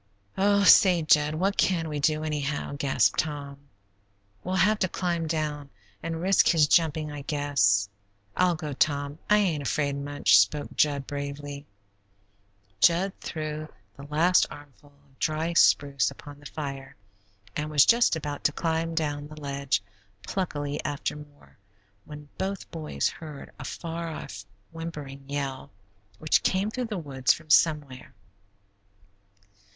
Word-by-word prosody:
"Oh, 200 +1 +3
say, 180 -4 +6
Jud, 150 0 +3
what 195 +5 0
can 170 -4 +1
we 150 -1 -3
do, 155 +1 +1
anyhow?" 150 -2 -3
gasped 140 -1 +1
Tom. 145 -3 -3 0.8
"We'll 185 +1 -2
have 210 +3 +3
to 185 - +2
climb 170 -3 -2
down 150 -3 -3 0.3
an' 165 0 -3
risk 185 +4 +3
his 160 -3 +4
jumping, 155 -1 +2
I 145 -1 -6
guess. 140 -10 +2 0.5
I'll 180 -1 +3
go, 155 -3 -5
Tom. 145 +1 0
I 210 - +6
ain't 175 -8 +1
afraid, 140 0 -1
much," 140 -8 +3
spoke 145 +9 0
Jud, 145 -2 +1
bravely. 145 0 -6 1.1
Jud 175 - +3
threw 155 -1 -5 0.3
the 140 - -11
last 165 +5 +3
armful 145 0 -14 0.2
of 135 -1 -29
dry 160 +2 -1
spruce 140 -5 +4
upon 145 +1 -12
the 145 - -10
fire, 140 -3 -6 0.6
and 150 +1 -3
was 150 -2 +5
just 235 -5 +4
about 145 -2 -5
to - - +4
climb 165 +1 -2
down 145 -2 -2
the 155 0 -11
ledge 140 -8 -1 0.4
pluckily 145 -6 -3
after 145 +1 -3
more, 145 -5 -15 0.5
when 150 -1 -10
both 195 0 -4
boys 155 -2 -2
heard 150 -3 -8
a - - -6
far 170 0 -5
off, 155 -10 -7 0.3
whimpering 145 -4 -8
yell, 140 -2 -4 0.5
which 155 +8 +2
came 195 +3 0
through 250 +2 -3
the 215 -3 -4
woods 135 -6 +1
from 155 -2 -8
somewhere. 145 -7 +2
150 Hz, 140 wpm, -27 LUFS, 145-165 Hz, 1.1 s, say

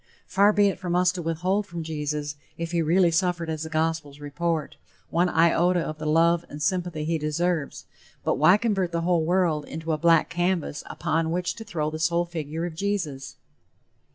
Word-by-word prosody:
Far 200 +2 +4
be 205 -1 +4
it 195 - -5
from 175 -2 -2
us 180 0 +4
to 180 -1 -5
withhold 180 +5 -1
from 170 -2 -5
Jesus, 150 -2 -3 0.2
if 170 0 -4
he 170 -1 +1
really 170 +2 +3
suffered 170 -1 0
as 155 -1 -4
the 160 - -5
gospels 155 -2 -2
report, 155 +2 -2 0.4
one 175 +2 +2
iota 175 +2 +3
of 155 -1 -5
the 155 - -4
love 165 +2 +3
and 145 - -8
sympathy 175 -2 -1
he 165 0 0
deserves, 155 0 -1 0.4
but - - 0
why 180 +7 +6
convert 200 -6 0
the 170 - 0
whole 170 -1 +2
world 170 -3 +1
into 160 +2 -5
a 155 - 0
black 165 -1 +4
canvas 175 -3 -1
upon 160 0 -1
which 180 +2 -1
to 225 - -9
throw 160 -8 -3
the 155 - -5
sole 170 +2 +1
figure 165 -1 -4
of 175 - -5
Jesus? 160 -8 -3
165 Hz, 190 wpm, -25 LUFS, 155-180 Hz, 0.4 s, why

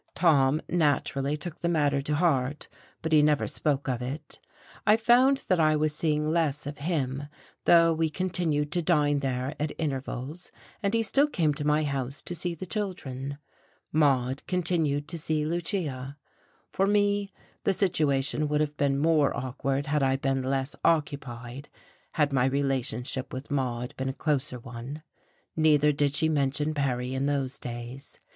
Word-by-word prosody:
Tom 150 -3 +3
naturally 145 -3 +1
took 170 +2 -6
the 170 - 0
matter 145 -4 +2
to 150 +2 -1
heart, 145 -4 0 0.4
but 160 - -2
he 155 -1 +6
never 150 -1 +3
spoke 145 -2 -1
of 125 -2 -1
it; 130 +5 -6 0.5
I 210 +1 +6
found 250 +4 +4
that 185 -2 +2
I 155 -1 +4
was 155 0 +1
seeing 150 -1 0
less 155 -3 0
of 145 +1 -6
him, 145 -4 -2 0.4
though 165 -1 +6
we 160 0 0
continued 160 -4 -1
to 175 - +1
dine 150 -4 +2
there 130 0 -2
at 150 +1 -2
intervals, 145 +2 -4 0.3
and 200 +1 0
he 230 - +2
still 275 +7 +3
came 165 - +1
to 145 0 -3
my 150 +1 +3
house 135 -2 -3
to - - -5
see 175 0 -1
the 175 - -6
children. 140 - -4 0.6
Maude 135 -3 +2
continued 160 -5 0
to 170 0 -3
see 155 -1 -1
Lucia. 155 -5 -2 0.5
For 195 +1 +1
me, 205 -1 +2 0.3
the - - +3
situation 155 -6 +1
would 150 0 0
have 150 -1 -1
been 140 -1 +1
more 150 -1 +3
awkward 135 +2 -2
had 150 0 0
I 135 0 +2
been 135 0 0
less 135 +1 -2
occupied, 140 -4 -1 0.4
had 150 -3 +1
my 130 -2 +3
relationship 130 -1 -1
with 130 +3 -7
Maude 125 -3 -2
been 130 0 -2
a - - -3
closer 140 -3 -1
one. 125 +5 -8 0.5
Neither 150 -2 +4
did 145 -1 0
she 160 +2 +2
mention 145 0 0
Perry 130 -3 -1
in 135 +1 0
those 140 -2 -1
days. 120 +3 -8
145 Hz, 165 wpm, -27 LUFS, 135-160 Hz, 0.6 s, he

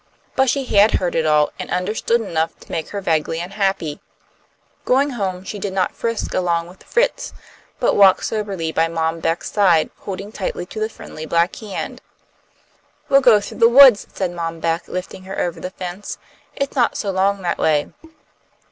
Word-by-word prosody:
But 265 -1 +3
she 275 +1 0
had 205 -2 +4
heard 180 -2 0
it 160 -1 +1
all, 150 -1 +3
and - - -5
understood 215 +5 0
enough 165 -6 -2
to - - -14
make 160 -2 -3
her 200 - -4
vaguely 165 -2 0
unhappy. 190 -4 -2 0.8
Going 275 +3 +2
home 190 -6 -3
she 205 +1 -6
did 195 -1 -4
not 190 -1 0
frisk 230 -1 -3
along 170 -2 0
with 185 - -16
Fritz, 485 +1 -1 0.4
but - - +2
walked 195 -2 +5
soberly 195 -7 -2
by 165 +1 +2
Mom 165 0 -2
Beck's 165 +1 -2
side, 180 -6 +3
holding 195 +1 -6
tight 195 - -3
to 180 +5 -6
the 215 0 -1
friendly 160 -7 -9
black 170 +3 +1
hand. 210 -4 -6 1.1
"We'll 275 0 +6
go 240 -5 +6
through 205 - -9
the 230 - +6
woods," 255 -3 +8
said 185 -3 -2
Mom 165 -1 -4
Beck, 165 +1 -1
lifting 185 +1 -6
her 195 - -5
over 175 -1 -2
the 180 - -5
fence. 185 +1 -7 0.4
"It's 275 +1 -3
not 245 -3 +2
so 200 - -2
long 195 +1 +1
that 175 - -1
way." 150 -2 +1
190 Hz, 180 wpm, -20 LUFS, 165-210 Hz, 1.1 s, woods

